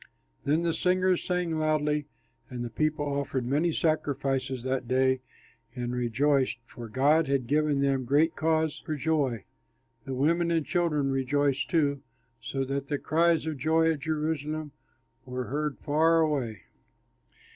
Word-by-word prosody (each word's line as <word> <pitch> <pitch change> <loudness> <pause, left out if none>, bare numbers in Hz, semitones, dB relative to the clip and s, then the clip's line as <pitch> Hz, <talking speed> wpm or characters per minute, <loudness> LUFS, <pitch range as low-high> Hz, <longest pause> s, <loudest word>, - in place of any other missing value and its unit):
Then 155 +4 +2
the 170 -1 +1
singers 185 +1 +2
sang 180 -3 -1
loudly, 150 -1 +1 0.4
and 120 -1 -4
the 120 - -6
people 155 +2 0
offered 140 -3 -2
many 150 +7 +1
sacrifices 135 -5 -1
that 130 -1 -2
day 130 0 +2 0.5
and 120 0 -3
rejoiced, 130 +2 +1
for 115 -1 -10
God 145 +7 +3
had 135 -2 0
given 150 +1 +1
them 135 -2 +1
great 150 +6 +3
cause 160 -1 0
for 155 - -3
joy. 140 -7 0 0.6
The 135 - -4
women 170 +6 +2
and 165 -3 +1
children 150 -6 +1
rejoiced, 140 +1 0
too, 145 -4 +1 0.4
so 135 +3 -2
that 140 +1 -3
the 145 - -1
cries 165 +2 +2
of 155 -2 -3
joy 160 +2 +3
at 155 - -3
Jerusalem 155 0 -2 0.5
were 125 0 -4
heard 150 +1 -2
far 160 +2 +3
away. 135 -9 -1
145 Hz, 145 wpm, -28 LUFS, 135-160 Hz, 0.6 s, God